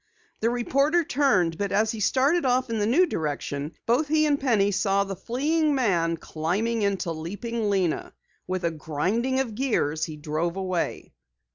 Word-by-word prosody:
The 225 Hz, -, +1 dB
reporter 275 Hz, +7 st, +2 dB
turned, 245 Hz, -, +1 dB
but 200 Hz, -1 st, -1 dB
as 215 Hz, +2 st, +2 dB
he 225 Hz, -, -6 dB
started 275 Hz, -, +2 dB
off 255 Hz, -1 st, +1 dB
in 225 Hz, -, -1 dB
the 205 Hz, -, +1 dB
new 315 Hz, +11 st, +4 dB
direction, 150 Hz, -, -3 dB
both 250 Hz, +7 st, +2 dB
he 310 Hz, +1 st, +3 dB
and 290 Hz, -2 st, +2 dB
Penny 215 Hz, -7 st, +2 dB
saw 200 Hz, 0 st, +2 dB
the 195 Hz, -1 st, -5 dB
fleeing 290 Hz, -, 0 dB
man 170 Hz, -10 st, +1 dB
climbing 190 Hz, +10 st, -2 dB
into 195 Hz, -4 st, 0 dB
Leaping 205 Hz, +8 st, -3 dB
Lena. 185 Hz, -5 st, -1 dB, 0.3 s
With 185 Hz, -1 st, -2 dB
a 170 Hz, -, +1 dB
grinding 185 Hz, -, -1 dB
of 255 Hz, -5 st, -2 dB
gears, 185 Hz, -, 0 dB
he 155 Hz, -2 st, -8 dB
drove 160 Hz, +3 st, -2 dB
away. 185 Hz, -3 st, -3 dB
210 Hz, 165 wpm, -25 LUFS, 170-260 Hz, 0.3 s, new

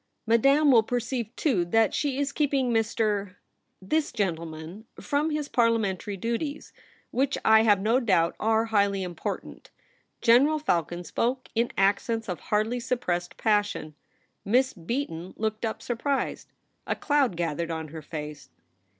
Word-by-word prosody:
' -, -, -51 dB
Madame 275 Hz, +6 st, +4 dB
will 235 Hz, -3 st, +7 dB
per 245 Hz, +3 st, -1 dB
ceive, 240 Hz, -1 st, -3 dB
too, 240 Hz, -, +1 dB
that 220 Hz, +5 st, +2 dB
she 280 Hz, -3 st, -1 dB
is 280 Hz, 0 st, 0 dB
keeping 275 Hz, -4 st, +1 dB
Mr., 215 Hz, -3 st, 0 dB, 0.4 s
this 295 Hz, +11 st, -1 dB
gentleman, 170 Hz, +1 st, -4 dB
from 285 Hz, +9 st, 0 dB
his 300 Hz, -2 st, -2 dB
Parliamentary 215 Hz, -5 st, 0 dB
duties, 235 Hz, -, -3 dB, 0.4 s
which, 275 Hz, +2 st, 0 dB
I 220 Hz, 0 st, +7 dB
have 210 Hz, -3 st, +4 dB
no 225 Hz, +6 st, +2 dB
doubt, 185 Hz, -9 st, +2 dB
are 220 Hz, +1 st, +2 dB
highly 200 Hz, -2 st, +2 dB
important.' 175 Hz, -2 st, -6 dB, 0.5 s
General 270 Hz, +6 st, +5 dB
Falcon 175 Hz, -, -1 dB
spoke 250 Hz, +9 st, -2 dB
in 235 Hz, +1 st, +1 dB
accents 205 Hz, +3 st, +1 dB
of 180 Hz, -3 st, -4 dB
hardly 215 Hz, +4 st, 0 dB
suppressed 180 Hz, -8 st, -2 dB
passion. 205 Hz, -7 st, 0 dB, 0.5 s
Miss 255 Hz, +5 st, +2 dB
Beaton 180 Hz, -2 st, -4 dB
looked 220 Hz, 0 st, -2 dB
up, 220 Hz, -, -4 dB
surprised. 270 Hz, +4 st, -2 dB, 0.4 s
A -, -, 0 dB
cloud 280 Hz, -, +1 dB
gathered 170 Hz, -1 st, -2 dB
on 160 Hz, -1 st, -4 dB
her 160 Hz, +1 st, -8 dB
face. 150 Hz, -1 st, -7 dB
220 Hz, 140 wpm, -27 LUFS, 185-250 Hz, 0.5 s, will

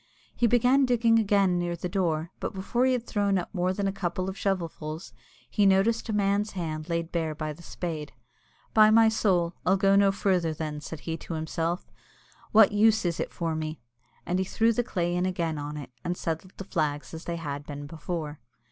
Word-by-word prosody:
He 240 Hz, -, +3 dB
began 250 Hz, +4 st, +4 dB
digging 230 Hz, -2 st, +4 dB
again 195 Hz, -4 st, +3 dB
near 175 Hz, 0 st, -1 dB
the 170 Hz, -, -4 dB
door, 170 Hz, -3 st, -1 dB
but -, -, -4 dB
before 235 Hz, +7 st, +1 dB
he 260 Hz, -, +3 dB
had 245 Hz, -2 st, -2 dB
thrown 200 Hz, -3 st, +1 dB
up 180 Hz, -, -4 dB
more 180 Hz, -1 st, +1 dB
than 195 Hz, +1 st, -1 dB
a -, -, +1 dB
couple 185 Hz, -1 st, -2 dB
of -, -, -10 dB
shovelfuls, 170 Hz, -5 st, -3 dB, 0.3 s
he 205 Hz, -1 st, +3 dB
noticed 210 Hz, +5 st, +2 dB
a -, -, +1 dB
man's 205 Hz, 0 st, +1 dB
hand 160 Hz, -3 st, -4 dB
laid 170 Hz, 0 st, -2 dB
bare 160 Hz, -2 st, -1 dB
by 155 Hz, 0 st, -3 dB
the 165 Hz, -, -15 dB
spade. 160 Hz, -3 st, -5 dB, 0.6 s
"By 215 Hz, -1 st, +7 dB
my 225 Hz, 0 st, +6 dB
soul, 180 Hz, -6 st, +1 dB
I'll 190 Hz, +1 st, +3 dB
go 195 Hz, 0 st, +4 dB
no 200 Hz, 0 st, +5 dB
further, 180 Hz, -5 st, +1 dB
then," 150 Hz, -1 st, -4 dB
said 155 Hz, 0 st, -7 dB
he 165 Hz, -1 st, -3 dB
to 165 Hz, -, -6 dB
himself; 165 Hz, +2 st, -2 dB, 0.6 s
"what 220 Hz, -1 st, +7 dB
use 215 Hz, 0 st, +4 dB
is 170 Hz, -1 st, -1 dB
it -, -, -2 dB
for 165 Hz, -2 st, -2 dB
me?" 155 Hz, 0 st, -4 dB, 0.5 s
And 180 Hz, +1 st, 0 dB
he 190 Hz, -, 0 dB
threw 225 Hz, +4 st, +2 dB
the 245 Hz, -, +1 dB
clay 175 Hz, -5 st, -1 dB
in 180 Hz, +1 st, +1 dB
again 170 Hz, -4 st, -2 dB
on 145 Hz, +1 st, -5 dB
it, 140 Hz, -4 st, -8 dB
and 175 Hz, +1 st, -2 dB
settled 165 Hz, +3 st, -4 dB
the -, -, -5 dB
flags 150 Hz, -7 st, -2 dB
as 160 Hz, +1 st, -7 dB
they 170 Hz, -, -2 dB
had 145 Hz, -3 st, -5 dB
been 145 Hz, 0 st, -6 dB
before. 155 Hz, 0 st, -5 dB
180 Hz, 210 wpm, -27 LUFS, 160-200 Hz, 0.6 s, By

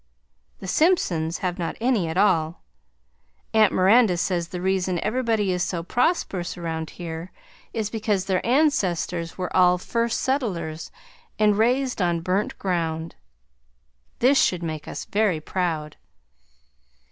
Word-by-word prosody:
The 190 Hz, -, -9 dB
Simpsons 180 Hz, -, +2 dB
have 180 Hz, +1 st, -2 dB
not 170 Hz, -, -3 dB
any 230 Hz, -7 st, +1 dB
at 160 Hz, +2 st, -3 dB
all. 170 Hz, -5 st, +2 dB, 0.9 s
Aunt 215 Hz, -2 st, +5 dB
Miranda 195 Hz, 0 st, +4 dB
says 175 Hz, -1 st, -1 dB
the 180 Hz, +1 st, -6 dB
reason 185 Hz, -1 st, 0 dB
everybody 220 Hz, -4 st, 0 dB
is 180 Hz, -1 st, -1 dB
so 170 Hz, -2 st, -2 dB
prosperous 190 Hz, -, -1 dB
around 160 Hz, -2 st, -4 dB
here 165 Hz, 0 st, -6 dB, 0.4 s
is 215 Hz, -2 st, -3 dB
because 210 Hz, -4 st, -1 dB
their 190 Hz, -2 st, 0 dB
ancestors 190 Hz, -, +1 dB
were 180 Hz, -1 st, -4 dB
all 180 Hz, -1 st, +5 dB
first 230 Hz, +5 st, -1 dB
settlers 175 Hz, -, -2 dB, 0.5 s
and 210 Hz, -1 st, +4 dB
raised 245 Hz, +2 st, +1 dB
on 170 Hz, -2 st, +1 dB
burnt 185 Hz, +4 st, -1 dB
ground. 165 Hz, -3 st, -2 dB, 1.0 s
This 270 Hz, +3 st, +4 dB
should 180 Hz, -2 st, +1 dB
make 155 Hz, -2 st, -5 dB
us -, -, -6 dB
very 200 Hz, -6 st, +1 dB
proud. 155 Hz, -2 st, -3 dB
185 Hz, 130 wpm, -24 LUFS, 170-220 Hz, 1.0 s, Aunt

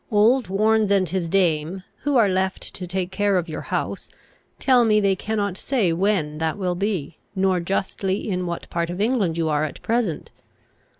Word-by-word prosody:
Old 230 Hz, +4 st, +4 dB
Warnes 215 Hz, +2 st, +2 dB
and 195 Hz, -2 st, +3 dB
his 175 Hz, 0 st, -2 dB
dame, 175 Hz, -1 st, +1 dB, 0.2 s
who 285 Hz, -1 st, +1 dB
are 225 Hz, -4 st, +5 dB
left 190 Hz, 0 st, -1 dB
to 180 Hz, -, -6 dB
take 185 Hz, 0 st, -2 dB
care 200 Hz, 0 st, +1 dB
of 175 Hz, -1 st, -1 dB
your 155 Hz, -, -5 dB
house, -, -, -3 dB, 0.5 s
tell 255 Hz, -2 st, +4 dB
me 215 Hz, -2 st, +4 dB
they 195 Hz, -2 st, +2 dB
cannot 200 Hz, -2 st, -2 dB
say 215 Hz, -11 st, +1 dB
when 165 Hz, -5 st, 0 dB
that 160 Hz, +1 st, -1 dB
will 185 Hz, -3 st, -1 dB
be, 180 Hz, -5 st, -3 dB, 0.2 s
nor 190 Hz, -1 st, +2 dB
justly 190 Hz, +2 st, -2 dB
in 180 Hz, -3 st, -1 dB
what 170 Hz, 0 st, -5 dB
part 170 Hz, 0 st, -1 dB
of 175 Hz, +2 st, -5 dB
England 210 Hz, -7 st, +1 dB
you 165 Hz, -1 st, 0 dB
are 150 Hz, -1 st, +1 dB
at 150 Hz, -3 st, -4 dB
present. 225 Hz, -9 st, -1 dB
190 Hz, 185 wpm, -23 LUFS, 170-210 Hz, 0.5 s, are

